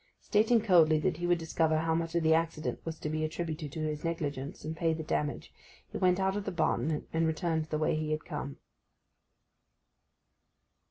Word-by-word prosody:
Stating 225 Hz, +2 st, +3 dB
coldly 170 Hz, -7 st, +5 dB
that 175 Hz, -1 st, 0 dB
he 175 Hz, +1 st, -2 dB
would 175 Hz, 0 st, +4 dB
discover 160 Hz, -1 st, +1 dB
how 160 Hz, +1 st, +1 dB
much 165 Hz, 0 st, -1 dB
of 170 Hz, -, +2 dB
the 160 Hz, 0 st, +5 dB
accident 165 Hz, -1 st, -1 dB
was 165 Hz, -1 st, -5 dB
to -, -, -5 dB
be 155 Hz, +1 st, -1 dB
attributed 155 Hz, -2 st, -3 dB
to 160 Hz, -, -4 dB
his 155 Hz, -1 st, -2 dB
negligence, 145 Hz, -5 st, -3 dB
and 160 Hz, +1 st, -3 dB
pay 165 Hz, 0 st, +1 dB
the 160 Hz, 0 st, -4 dB
damage, 150 Hz, -1 st, -2 dB, 0.4 s
he -, -, -4 dB
went 180 Hz, 0 st, +3 dB
out 190 Hz, 0 st, +1 dB
of 205 Hz, -, -2 dB
the -, -, -2 dB
barton, 155 Hz, -2 st, 0 dB
and 165 Hz, 0 st, +2 dB
returned 160 Hz, -1 st, 0 dB
the 155 Hz, 0 st, -2 dB
way 155 Hz, 0 st, +1 dB
he 155 Hz, 0 st, -2 dB
had 155 Hz, 0 st, -2 dB
come. 140 Hz, 0 st, -5 dB
160 Hz, 195 wpm, -31 LUFS, 155-170 Hz, 0.4 s, coldly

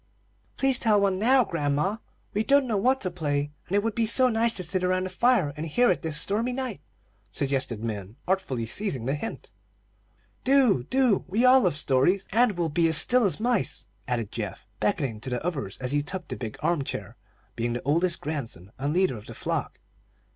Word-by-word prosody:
"Please 270 Hz, -2 st, +3 dB
tell 215 Hz, -3 st, +3 dB
one 195 Hz, -2 st, +1 dB
now, 255 Hz, +4 st, +4 dB
grandma. 150 Hz, +5 st, -1 dB, 0.4 s
We 210 Hz, -, 0 dB
don't 280 Hz, +3 st, +4 dB
know 230 Hz, -4 st, -1 dB
what 255 Hz, +7 st, +2 dB
to 185 Hz, -, -1 dB
play, 145 Hz, -4 st, -2 dB, 0.2 s
and 190 Hz, -, -2 dB
it 205 Hz, -, +2 dB
would 225 Hz, -1 st, -1 dB
be 230 Hz, 0 st, +1 dB
so 255 Hz, +3 st, +5 dB
nice 230 Hz, 0 st, +2 dB
to 185 Hz, -, -1 dB
sit 185 Hz, +2 st, -2 dB
around 185 Hz, 0 st, +1 dB
the 185 Hz, -, -4 dB
fire 195 Hz, -, +2 dB
and 155 Hz, -, -5 dB
hear 240 Hz, +10 st, +3 dB
it 180 Hz, -, -1 dB
this 155 Hz, -2 st, -2 dB
stormy 225 Hz, +8 st, +1 dB
night," 250 Hz, -, -4 dB, 0.5 s
suggested 130 Hz, -5 st, -1 dB
Min, 105 Hz, -2 st, -5 dB
artfully 180 Hz, -11 st, -1 dB
seizing 135 Hz, -, -1 dB
the 135 Hz, -, 0 dB
hint. 150 Hz, +10 st, -6 dB, 0.9 s
"Do! 255 Hz, -, +4 dB
Do! 255 Hz, -, +2 dB
We 215 Hz, +7 st, +1 dB
all 260 Hz, +1 st, +7 dB
love 175 Hz, -, +1 dB
stories, 150 Hz, +8 st, +2 dB
and 230 Hz, +1 st, +3 dB
we'll 170 Hz, -2 st, 0 dB
be 165 Hz, +2 st, +2 dB
as 160 Hz, -1 st, +5 dB
still 245 Hz, +10 st, +4 dB
as 195 Hz, -, 0 dB
mice," 215 Hz, -, -1 dB, 0.2 s
added 115 Hz, -4 st, -2 dB
Geoff, 105 Hz, -5 st, -6 dB
beckoning 140 Hz, -, -1 dB
to 125 Hz, -, -6 dB
the 125 Hz, +5 st, -3 dB
others 135 Hz, -, -3 dB
as 125 Hz, 0 st, 0 dB
he 145 Hz, 0 st, +2 dB
took 180 Hz, +4 st, -5 dB
the -, -, -3 dB
big 110 Hz, -4 st, -6 dB
arm 170 Hz, -5 st, +1 dB
chair, -, -, -6 dB, 0.4 s
being 120 Hz, +1 st, -2 dB
the 120 Hz, -, -4 dB
oldest 170 Hz, +5 st, +1 dB
grandson 120 Hz, -, -5 dB
and 145 Hz, +4 st, -1 dB
leader 185 Hz, -7 st, +2 dB
of 105 Hz, -, -12 dB
the -, -, -9 dB
flock. -, -, -3 dB
180 Hz, 205 wpm, -26 LUFS, 140-220 Hz, 0.9 s, all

